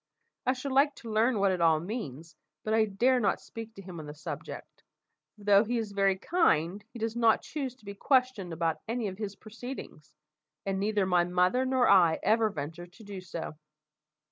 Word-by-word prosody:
I 255 Hz, -, +4 dB
should 265 Hz, +1 st, -5 dB
like 280 Hz, +2 st, +4 dB
to 230 Hz, -, -8 dB
learn 225 Hz, +2 st, +3 dB
what 195 Hz, -1 st, +3 dB
it 180 Hz, -2 st, -1 dB
all 160 Hz, -2 st, +5 dB
means, 165 Hz, -, -6 dB, 0.3 s
but 215 Hz, -, -1 dB
I 220 Hz, 0 st, +4 dB
dare 240 Hz, +6 st, +2 dB
not 200 Hz, -5 st, +1 dB
speak 225 Hz, -1 st, -9 dB
to 195 Hz, -, -10 dB
him 180 Hz, -3 st, -8 dB
on 155 Hz, -, -8 dB
the 150 Hz, -, -8 dB
subject, 155 Hz, -, -8 dB, 0.6 s
for 205 Hz, -, -15 dB
though 200 Hz, 0 st, +6 dB
he 240 Hz, +2 st, -1 dB
is 220 Hz, -3 st, -3 dB
very 195 Hz, -1 st, +2 dB
kind, 195 Hz, -, +1 dB
he -, -, -9 dB
does 225 Hz, 0 st, -2 dB
not 230 Hz, -2 st, +3 dB
choose 270 Hz, -5 st, -4 dB
to 250 Hz, -, -23 dB
be 200 Hz, -, -6 dB
questioned 250 Hz, -5 st, +1 dB
about 165 Hz, -1 st, -1 dB
any 230 Hz, -1 st, -1 dB
of 190 Hz, +2 st, -10 dB
his 205 Hz, -2 st, -4 dB
proceedings, 215 Hz, -, -9 dB, 0.5 s
and 195 Hz, -1 st, -1 dB
neither 205 Hz, -1 st, +1 dB
my 180 Hz, -2 st, +3 dB
mother 180 Hz, +8 st, +2 dB
nor 260 Hz, -1 st, +3 dB
I 175 Hz, -5 st, +6 dB
ever 220 Hz, 0 st, +3 dB
venture 165 Hz, 0 st, -6 dB
to 180 Hz, +6 st, -17 dB
do 200 Hz, -2 st, -7 dB
so." 165 Hz, -3 st, -7 dB
205 Hz, 200 wpm, -29 LUFS, 180-235 Hz, 0.6 s, though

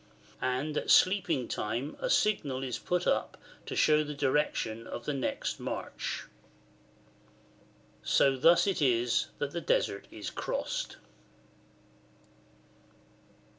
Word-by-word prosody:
And 130 Hz, +4 st, -1 dB
at -, -, -2 dB
sleeping 180 Hz, -, +4 dB
time 120 Hz, +8 st, -3 dB
a -, -, -2 dB
signal 145 Hz, -, +1 dB
is 125 Hz, -3 st, -3 dB
put 180 Hz, 0 st, -1 dB
up -, -, 0 dB, 0.3 s
to -, -, -4 dB
show 155 Hz, 0 st, +4 dB
the 150 Hz, 0 st, -6 dB
direction 130 Hz, -5 st, 0 dB
of 120 Hz, -, -7 dB
the 150 Hz, -, -1 dB
next 135 Hz, -, -2 dB
march.] -, -, -4 dB, 1.8 s
So 135 Hz, -, +3 dB
thus 170 Hz, +6 st, +5 dB
it 195 Hz, -5 st, 0 dB
is 120 Hz, -3 st, +2 dB
that 145 Hz, -1 st, -2 dB
the 170 Hz, -, -4 dB
Desert 100 Hz, -9 st, 0 dB
is 105 Hz, -, -6 dB
crossed. -, -, -3 dB
140 Hz, 115 wpm, -30 LUFS, 125-160 Hz, 1.8 s, thus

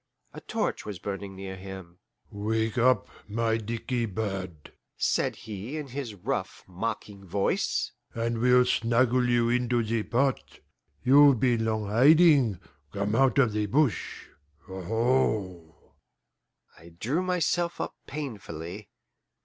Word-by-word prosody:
A -, -, -9 dB
torch -, -, -2 dB
was 105 Hz, -3 st, -6 dB
burning 95 Hz, +1 st, -6 dB
near 95 Hz, 0 st, -7 dB
him. 95 Hz, -2 st, -10 dB, 0.3 s
"Wake 110 Hz, +2 st, -1 dB
up, 125 Hz, +1 st, +3 dB, 0.2 s
my 115 Hz, +1 st, 0 dB
dickey 115 Hz, +2 st, -3 dB
bird," 95 Hz, -6 st, -5 dB, 0.2 s
said -, -, +1 dB
he 110 Hz, +6 st, -7 dB
in 150 Hz, -3 st, -6 dB
his 125 Hz, -4 st, -5 dB
rough, 100 Hz, -1 st, -4 dB
mocking 100 Hz, +1 st, -5 dB
voice, 95 Hz, +2 st, -1 dB, 0.2 s
"and 115 Hz, 0 st, -1 dB
we'll 125 Hz, +1 st, +5 dB
snuggle 125 Hz, +1 st, +2 dB
you 120 Hz, -1 st, +3 dB
into 120 Hz, -1 st, +1 dB
the 110 Hz, +1 st, -1 dB
pot. 130 Hz, +5 st, -1 dB, 0.4 s
You've 140 Hz, -1 st, +6 dB
been 120 Hz, -3 st, +2 dB
long 110 Hz, -1 st, -1 dB
hiding; 135 Hz, -, +5 dB, 0.3 s
come 100 Hz, +1 st, -2 dB
out 135 Hz, +2 st, +3 dB
of 125 Hz, -5 st, +4 dB
the 105 Hz, 0 st, 0 dB
bush 135 Hz, +2 st, 0 dB, 0.4 s
aho!" 95 Hz, -3 st, -1 dB, 0.9 s
I 85 Hz, +1 st, -16 dB
drew 145 Hz, +10 st, 0 dB
myself 175 Hz, -1 st, 0 dB
up -, -, -3 dB
painfully. 100 Hz, -, -7 dB
115 Hz, 125 wpm, -27 LUFS, 100-125 Hz, 0.9 s, You've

